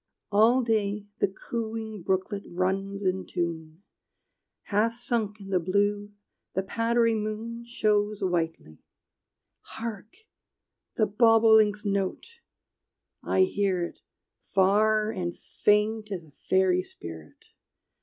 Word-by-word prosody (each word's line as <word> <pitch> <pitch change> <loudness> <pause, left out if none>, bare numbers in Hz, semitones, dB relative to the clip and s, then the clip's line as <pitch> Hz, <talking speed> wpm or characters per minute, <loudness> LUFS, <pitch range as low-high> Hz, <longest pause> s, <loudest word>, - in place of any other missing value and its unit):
All 225 +5 +5
day 210 -3 0
the - - +3
cooing 220 +1 -5
brooklet 190 +3 -1
runs 195 +3 -2
in 185 0 0
tune: 165 -1 -4 0.8
Half 225 +3 +1
sunk 230 -4 -2
i' - - -10
th' 180 - +2
blue, 205 +2 0 0.4
the 190 - +1
powdery 230 +3 +1
moon 220 +2 -4
Shows 210 -3 0
whitely. 165 - -2 0.8
Hark, 225 - -8 0.7
the 215 - +3
bobolink's 220 -1 +4
note! 200 - -2 0.8
I 190 - +1
hear 185 -1 +1
it, 170 - -6 0.5
Far 215 +3 +3
and 180 -5 -4
faint 210 +1 +1
as 180 -4 -4
a 150 - -20
fairy 185 +4 +2
spirit! 80 - -11
205 Hz, 105 wpm, -27 LUFS, 185-220 Hz, 0.8 s, All